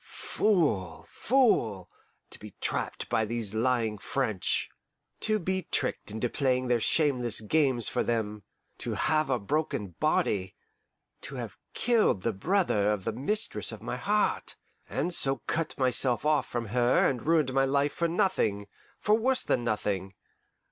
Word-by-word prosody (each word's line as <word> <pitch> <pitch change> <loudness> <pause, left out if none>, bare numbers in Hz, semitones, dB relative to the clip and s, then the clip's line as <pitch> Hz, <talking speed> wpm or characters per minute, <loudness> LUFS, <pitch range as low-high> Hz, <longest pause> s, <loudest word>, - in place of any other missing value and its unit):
Fool, 145 - 0
fool! 120 - +2 0.4
to - - -8
be - - -11
trapped - - -3
by 110 - +1
these 110 -2 -3
lying 115 -2 0
French! 110 -5 -1 0.5
To 215 0 +2
be 190 -2 -2
tricked 125 - -1
into 110 +3 -2
playing 130 0 0
their 120 -1 +2
shameless 125 -4 +1
games 130 -1 +2
for - - 0
them, 105 -3 -2 0.4
to - - -2
have 155 -2 +1
a 130 - +2
broken 115 -1 -2
body, 95 -2 +1 0.7
to - - -7
have - - -6 0.2
killed 225 - +2
the 115 - 0
brother 105 - +1
of 105 -3 -2
the 115 - -2
mistress 210 - +1
of - - -9
my - - -3
heart, 210 +1 0 0.3
and 180 - -1
so 135 -5 -1
cut 165 0 -2
myself 130 -1 +1
off 150 -3 +2
from 115 -3 -4
her 120 +2 +3
and 130 +1 -3
ruined 155 -5 +3
my 135 0 +3
life 140 +1 +1
for 170 - 0
nothing 115 - 0 0.3
for 210 - +1
worse 255 +4 +2
than 120 - 0
nothing! 100 -4 -2
125 Hz, 150 wpm, -28 LUFS, 110-160 Hz, 0.7 s, her